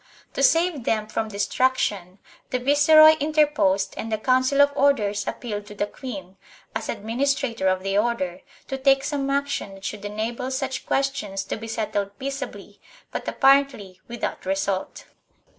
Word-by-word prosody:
To -, -, -2 dB
save 325 Hz, 0 st, +3 dB
them 215 Hz, -1 st, +1 dB
from 220 Hz, +1 st, -3 dB
destruction 205 Hz, -3 st, 0 dB, 0.3 s
the 255 Hz, -, 0 dB
viceroy 290 Hz, +4 st, +7 dB
interposed 295 Hz, -10 st, +2 dB
and 225 Hz, -, -5 dB
the 220 Hz, -, +1 dB
Council 255 Hz, +4 st, +2 dB
of 285 Hz, 0 st, +5 dB
Orders 210 Hz, -8 st, +1 dB
appealed 210 Hz, -4 st, -5 dB
to 210 Hz, -, -10 dB
the 205 Hz, -, 0 dB
queen, 195 Hz, -6 st, -8 dB, 0.4 s
as -, -, -4 dB
administrator 230 Hz, 0 st, -1 dB
of 185 Hz, 0 st, +1 dB
the 195 Hz, +1 st, +1 dB
Order, 200 Hz, -6 st, -1 dB, 0.3 s
to 270 Hz, -, -4 dB
take 270 Hz, 0 st, +4 dB
some 280 Hz, -1 st, -2 dB
action 280 Hz, -8 st, -2 dB
that 195 Hz, -, -12 dB
should 210 Hz, -1 st, -5 dB
enable 220 Hz, +5 st, -3 dB
such 265 Hz, 0 st, -3 dB
questions 240 Hz, -8 st, -1 dB
to -, -, -4 dB
be 225 Hz, +1 st, -8 dB
settled 205 Hz, -3 st, -3 dB
peaceably, 275 Hz, +1 st, -6 dB, 0.3 s
but -, -, -5 dB
appar 275 Hz, +1 st, +5 dB
ently 190 Hz, -8 st, -12 dB
without 235 Hz, -5 st, -5 dB
result. 195 Hz, 0 st, -2 dB
235 Hz, 155 wpm, -24 LUFS, 200-275 Hz, 0.4 s, viceroy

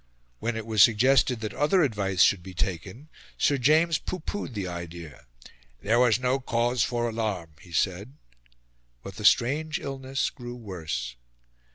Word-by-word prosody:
When 120 Hz, -1 st, -2 dB
it 110 Hz, -1 st, -5 dB
was 110 Hz, -2 st, +2 dB
suggested 125 Hz, +2 st, +4 dB
that 110 Hz, -1 st, -4 dB
other 175 Hz, +5 st, +2 dB
advice 100 Hz, -8 st, +2 dB
should 100 Hz, -, +3 dB
be 95 Hz, +1 st, -11 dB
taken, 95 Hz, -, -4 dB, 0.3 s
Sir 140 Hz, -2 st, +2 dB
James 155 Hz, +5 st, +3 dB
pooh 185 Hz, -, -5 dB
poohed 155 Hz, -, -5 dB
the 100 Hz, -3 st, -3 dB
idea: 85 Hz, -4 st, -8 dB, 0.6 s
"there 115 Hz, +4 st, +2 dB
was 125 Hz, -2 st, +4 dB
no 130 Hz, +1 st, +1 dB
cause 120 Hz, -1 st, 0 dB
for 120 Hz, +2 st, 0 dB
alarm," 105 Hz, -8 st, -3 dB
he 85 Hz, -, -16 dB
said. 95 Hz, -, -1 dB, 0.9 s
But 95 Hz, -, -9 dB
the 105 Hz, -, -5 dB
strange 145 Hz, +9 st, +3 dB
illness 135 Hz, 0 st, -3 dB
grew 120 Hz, -3 st, -8 dB
worse. 80 Hz, -, -5 dB
115 Hz, 155 wpm, -26 LUFS, 95-130 Hz, 0.9 s, suggested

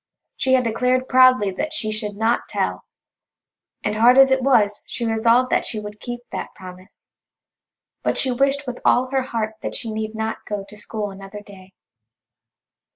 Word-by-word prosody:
She 260 Hz, -, +1 dB
had 255 Hz, -1 st, +4 dB
declared 250 Hz, +3 st, 0 dB
proudly 255 Hz, -6 st, +5 dB
that 300 Hz, +12 st, -4 dB
she 220 Hz, -8 st, -1 dB
should 215 Hz, -1 st, -3 dB
not 225 Hz, +2 st, 0 dB
tell, -, -, -2 dB, 1.0 s
and 210 Hz, -, -1 dB
hard 245 Hz, +3 st, +6 dB
as 270 Hz, 0 st, +7 dB
it 265 Hz, 0 st, +3 dB
was 220 Hz, -6 st, +2 dB
she 235 Hz, -, -4 dB
resolved 230 Hz, +3 st, +2 dB
that -, -, +2 dB
she 220 Hz, -, -2 dB
would 210 Hz, 0 st, -9 dB
keep 240 Hz, +1 st, -6 dB
that -, -, -6 dB
promise. 185 Hz, 0 st, -13 dB, 0.9 s
But -, -, -1 dB
she 260 Hz, -, +1 dB
wished 275 Hz, +3 st, +1 dB
with 250 Hz, -1 st, -6 dB
all 255 Hz, +1 st, +3 dB
her 270 Hz, -1 st, +1 dB
heart 220 Hz, -4 st, -3 dB
that -, -, -4 dB
she 225 Hz, -, -4 dB
need 215 Hz, 0 st, -4 dB
not 220 Hz, 0 st, -3 dB
go 205 Hz, -2 st, -3 dB
to 205 Hz, -, -13 dB
school 210 Hz, 0 st, -5 dB
another 195 Hz, +1 st, -10 dB
day. 190 Hz, -2 st, -15 dB
225 Hz, 175 wpm, -21 LUFS, 210-255 Hz, 1.0 s, as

